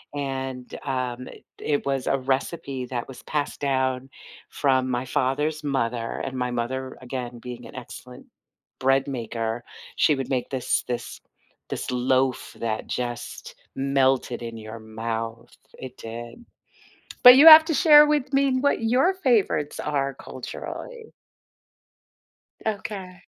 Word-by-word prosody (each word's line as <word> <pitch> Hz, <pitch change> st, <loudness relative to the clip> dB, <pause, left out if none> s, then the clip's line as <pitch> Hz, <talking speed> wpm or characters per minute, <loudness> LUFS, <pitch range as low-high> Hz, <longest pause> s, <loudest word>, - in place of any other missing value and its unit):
and, 130 Hz, -2 st, -4 dB
um, 125 Hz, -2 st, -3 dB
i -, -, -14 dB, 0.2 s
it 145 Hz, -1 st, -1 dB
was 135 Hz, -2 st, -1 dB
a 135 Hz, -, +2 dB
recipe 135 Hz, 0 st, -2 dB
that 120 Hz, -1 st, -4 dB
was 130 Hz, -2 st, -11 dB
passed 145 Hz, -1 st, -3 dB
down 130 Hz, -1 st, 0 dB, 0.4 s
from 130 Hz, -2 st, +1 dB
my 125 Hz, 0 st, -1 dB
father's 150 Hz, +5 st, -1 dB
mother, 120 Hz, -5 st, -2 dB
and 130 Hz, -1 st, -4 dB
my 125 Hz, 0 st, -1 dB
mother, 130 Hz, +2 st, -3 dB
again, 125 Hz, -1 st, -6 dB
being 120 Hz, 0 st, -8 dB
an -, -, -14 dB
excellent 125 Hz, 0 st, -10 dB, 0.5 s
bread 135 Hz, +1 st, +2 dB
maker, 115 Hz, -2 st, -3 dB, 0.3 s
she 155 Hz, -, +4 dB
would 135 Hz, -2 st, -4 dB
make 130 Hz, -2 st, -1 dB
this 130 Hz, -2 st, 0 dB
this 120 Hz, -1 st, -5 dB, 0.5 s
this -, -, -4 dB
loaf 130 Hz, +1 st, 0 dB
that 110 Hz, -2 st, -2 dB
just 120 Hz, -1 st, -5 dB, 0.2 s
melted 135 Hz, -2 st, +1 dB
in 115 Hz, -1 st, -6 dB
your 110 Hz, +1 st, -8 dB
mouth, 115 Hz, +1 st, -5 dB, 0.2 s
it 130 Hz, -1 st, -9 dB
did. 120 Hz, -, -9 dB, 0.8 s
But 250 Hz, 0 st, +12 dB
you 290 Hz, +4 st, +8 dB
have 315 Hz, 0 st, +12 dB
to 320 Hz, -, 0 dB
share 300 Hz, -2 st, +8 dB
with 295 Hz, -2 st, 0 dB
me 275 Hz, -1 st, +2 dB
what 285 Hz, -3 st, +1 dB
your 255 Hz, +11 st, +3 dB
favorites 230 Hz, -, +1 dB
are, 140 Hz, -2 st, -1 dB
culturally. 470 Hz, -3 st, -8 dB, 1.5 s
Okay. 195 Hz, -4 st, -5 dB
130 Hz, 135 wpm, -24 LUFS, 120-150 Hz, 1.5 s, But